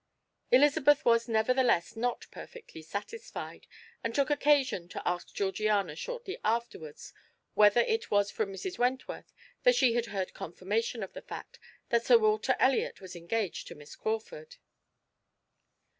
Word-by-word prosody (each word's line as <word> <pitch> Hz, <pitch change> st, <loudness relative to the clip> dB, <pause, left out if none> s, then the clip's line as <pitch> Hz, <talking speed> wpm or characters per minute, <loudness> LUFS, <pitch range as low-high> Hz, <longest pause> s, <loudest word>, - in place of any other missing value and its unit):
Elizabeth 290 Hz, +2 st, +4 dB
was, 230 Hz, 0 st, +4 dB
nevertheless, 225 Hz, -4 st, +2 dB
not 240 Hz, +2 st, -2 dB
perfectly 460 Hz, -, -11 dB
satisfied, 325 Hz, -, -7 dB, 0.4 s
and 230 Hz, 0 st, -3 dB
took 280 Hz, 0 st, +2 dB
occasion 285 Hz, -10 st, +2 dB
to -, -, -6 dB
ask 175 Hz, 0 st, -2 dB
Georgiana 200 Hz, -3 st, 0 dB
shortly 475 Hz, -, -6 dB
afterwards 220 Hz, -10 st, -3 dB, 0.4 s
whether 210 Hz, +2 st, +6 dB
it 445 Hz, -, -1 dB
was 205 Hz, 0 st, +2 dB
from 210 Hz, -3 st, -2 dB
Mrs. 270 Hz, -, -6 dB
Wentworth 255 Hz, +2 st, -2 dB, 0.3 s
that -, -, +5 dB
she 255 Hz, -, +4 dB
had 235 Hz, 0 st, 0 dB
heard 195 Hz, -2 st, -4 dB
confirmation 210 Hz, +6 st, -3 dB
of 190 Hz, -, -8 dB
the -, -, -8 dB
fact -, -, -9 dB, 0.3 s
that 235 Hz, -1 st, +2 dB
Sir 240 Hz, -1 st, +7 dB
Walter 215 Hz, +3 st, +2 dB
Elliot 260 Hz, -1 st, +2 dB
was 185 Hz, -2 st, -10 dB
engaged 175 Hz, +3 st, -3 dB
to 170 Hz, -, -9 dB
Miss 145 Hz, -1 st, -12 dB
Crawford. 470 Hz, -, -4 dB
230 Hz, 140 wpm, -30 LUFS, 200-270 Hz, 0.4 s, Sir